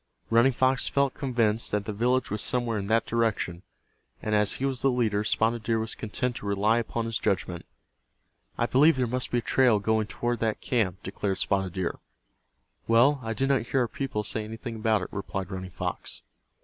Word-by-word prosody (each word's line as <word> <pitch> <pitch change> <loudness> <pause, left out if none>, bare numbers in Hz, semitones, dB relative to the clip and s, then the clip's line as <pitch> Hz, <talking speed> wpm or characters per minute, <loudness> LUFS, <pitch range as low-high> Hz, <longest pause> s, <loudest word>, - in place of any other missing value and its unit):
Running 115 +4 +5
Fox 130 +1 +2
felt 140 -1 +1
convinced 115 -5 +1
that 105 -1 -1
the 105 - -3
village 125 +3 +1
was 105 0 -2
somewhere 120 -3 0
in 100 - -4
that 115 +2 +2
direction, 110 -7 -1 0.6
and 110 - -3
as 105 -1 +3
he 135 - -2
was 130 -2 0
the 135 - +3
leader 110 -5 +1
Spotted 115 +2 +1
Deer 115 +1 0
was 110 0 -3
content 120 +3 -2
to 100 - -7
rely 105 +3 +2
upon 115 0 -3
his 115 -2 -2
judgment. 90 -3 -2 0.9
"I - - +2
believe 150 +5 +5
there 130 -1 +1
must 125 +2 -2
be 120 - 0
a - - +1
trail 125 -2 +3
going 110 +1 0
toward 120 +1 -2
that 110 -2 -1
camp," 100 -6 -1
declared 95 0 -2
Spotted 95 -2 0
Deer. 95 -3 -3 0.9
"Well, 125 +5 +5
I 115 -1 -3
did 135 +5 0
not 135 -4 +3
hear 135 - +1
our 120 - +1
people 120 -3 -3
say 110 +1 -2
anything 115 +2 -7
about 110 -3 +1
it," - - -4
replied 95 -1 -4
Running 95 0 -5
Fox. - - -5
115 Hz, 200 wpm, -27 LUFS, 105-125 Hz, 0.9 s, Running